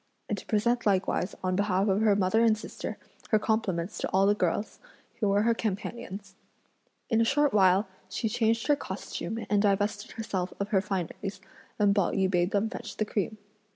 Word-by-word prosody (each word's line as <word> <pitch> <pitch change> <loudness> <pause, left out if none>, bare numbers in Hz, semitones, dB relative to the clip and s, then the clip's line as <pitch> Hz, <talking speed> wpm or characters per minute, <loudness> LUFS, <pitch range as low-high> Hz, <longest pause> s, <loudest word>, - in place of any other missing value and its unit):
and 210 - -1
to - - -14
present 235 +2 +1
likewise, 190 -1 +1
on 185 0 +1
behalf 195 0 +1
of 195 +1 +2
her 215 -2 +4
mother 205 +3 +3
and 220 -2 +4
sister, 220 - -6 0.3
her 215 - +5
compliments 210 -4 -1
to - - -2
all 190 +1 +3
the 205 - +5
girls, 205 +1 -1 0.4
who 210 - +2
were 200 +1 +3
her 230 +1 +3
companions. 210 -1 -4 0.8
In 225 0 +4
a - - +5
short 285 +4 +2
while, 195 0 +4 0.2
she 225 +4 -2
changed 225 +1 +1
her 295 - +4
costume 225 -4 -5
and 205 -1 +2
divested 205 0 0
herself 190 -5 -3
of 200 +1 -2
her 195 -3 +3
fineries, 195 0 -4 0.4
and 205 -2 +4
Pao 200 -3 +2
yü 190 -1 +1
bade 175 -1 +2
them 205 +2 +1
fetch 230 0 -7
the 215 - +1
cream. 210 +1 -2
205 Hz, 190 wpm, -28 LUFS, 190-220 Hz, 0.8 s, her